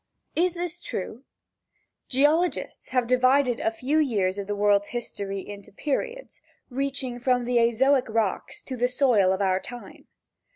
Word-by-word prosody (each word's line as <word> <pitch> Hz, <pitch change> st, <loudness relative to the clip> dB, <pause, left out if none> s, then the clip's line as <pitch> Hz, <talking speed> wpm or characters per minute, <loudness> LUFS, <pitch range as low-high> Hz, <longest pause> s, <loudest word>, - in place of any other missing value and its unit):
Is 355 Hz, +1 st, +1 dB
this 350 Hz, 0 st, -4 dB
true? 230 Hz, -, -6 dB, 0.8 s
Geologists 300 Hz, +7 st, +1 dB
have 250 Hz, -2 st, +1 dB
divided 255 Hz, 0 st, +3 dB
a -, -, +1 dB
few 260 Hz, +7 st, 0 dB
years 205 Hz, -9 st, +1 dB
of 200 Hz, -, -5 dB
the 205 Hz, -, -2 dB
worlds 205 Hz, 0 st, +3 dB
history 200 Hz, -5 st, -5 dB
into 200 Hz, -1 st, -10 dB
periods, 475 Hz, -, -4 dB, 0.3 s
reaching 265 Hz, -2 st, -3 dB
from 245 Hz, 0 st, +1 dB
the 245 Hz, 0 st, +1 dB
azoic 250 Hz, +3 st, +3 dB
rocks 220 Hz, -3 st, -2 dB
to 260 Hz, -, -5 dB
the 245 Hz, 0 st, +1 dB
soil 245 Hz, -8 st, +3 dB
of 190 Hz, +1 st, 0 dB
our 185 Hz, -1 st, +2 dB
time. 245 Hz, +4 st, -11 dB
245 Hz, 150 wpm, -26 LUFS, 205-275 Hz, 0.8 s, divided